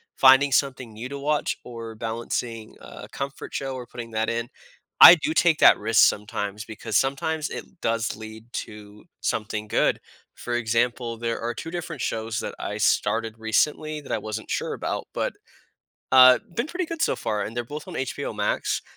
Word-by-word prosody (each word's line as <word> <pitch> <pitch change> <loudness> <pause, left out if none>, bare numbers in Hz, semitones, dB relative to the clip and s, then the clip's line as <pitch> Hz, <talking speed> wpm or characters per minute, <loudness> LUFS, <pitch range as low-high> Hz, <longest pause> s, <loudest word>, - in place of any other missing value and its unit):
finding 135 +1 +6
something 130 -4 0
new 110 +4 -6
to 140 0 -6
watch, 150 +1 0
or 115 -2 -8
balancing 115 0 -4
a - - -10
comfort 140 0 -6
show, 135 -1 -3
or 125 -1 -7
putting 120 -1 -8
that 110 +1 0
in, 115 0 -3 0.5
I - - +13
do 155 -1 -2
take 165 -3 +4
that - - +7
risk 110 +2 +5
sometimes 105 0 -4
because 110 0 -2
sometimes 150 +3 -1
it 185 - -9
does 115 0 -1
lead 110 0 -10
to 105 -1 -8 0.2
something 105 -1 -2
good. - - +1 0.3
For 120 - -4
example, 120 0 0
there 115 0 -2
are 120 +1 -3
2 165 +7 -7
different 170 -4 -5
shows 110 0 -2
that - - -5
I - - -4
started 115 0 +1
recently 150 +7 0
that 140 - -10
I - - +1
wasn't 110 +1 -6
sure - - -2
about, - - -4
but, - - -2 0.8
uh, 130 -1 +9 0.2
been 235 - -1
pretty 355 +3 -3
good 330 0 -6
so - - +1
far, 105 -1 -2
and 115 - -6
they're 120 - -1
both 150 +5 -8
on - - -7
HBO 130 - -3
Max. - - -1
120 Hz, 180 wpm, -25 LUFS, 110-140 Hz, 0.8 s, I